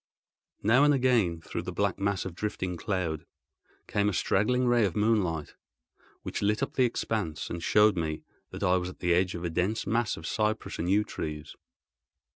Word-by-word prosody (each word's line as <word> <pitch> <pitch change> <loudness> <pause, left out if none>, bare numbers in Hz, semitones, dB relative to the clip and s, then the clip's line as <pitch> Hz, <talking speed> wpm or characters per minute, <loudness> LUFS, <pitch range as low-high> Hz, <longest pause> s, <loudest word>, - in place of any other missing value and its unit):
Now 115 +7 +5
and 145 -1 +5
again, 115 -11 +2
through - - -5
the - - -5
black - - -1
mass 100 -1 0
of 95 - -5
drifting 95 -2 -3
cloud, 85 -4 -2 0.6
came 105 0 +1
a - - -2
straggling 125 +8 +2
ray 120 -1 +4
of 95 -5 0
moonlight, 100 -8 +1 0.7
which - - -4
lit 105 +5 +1
up - - -3
the 130 - +3
expanse, 105 -8 -2
and 85 - -4
showed 105 +3 +4
me 80 -3 -3 0.3
that - - -7
I 90 +1 +4
was 90 0 -3
at 90 - -11
the 90 -1 +1
edge 90 +1 +1
of 85 - -6
a 85 - -1
dense 90 +7 0
mass 115 0 0
of 80 - -9
cypress 110 +3 -1
and 85 - -1
yew 105 +2 +4
trees. 75 -5 -6
100 Hz, 190 wpm, -28 LUFS, 85-110 Hz, 0.7 s, Now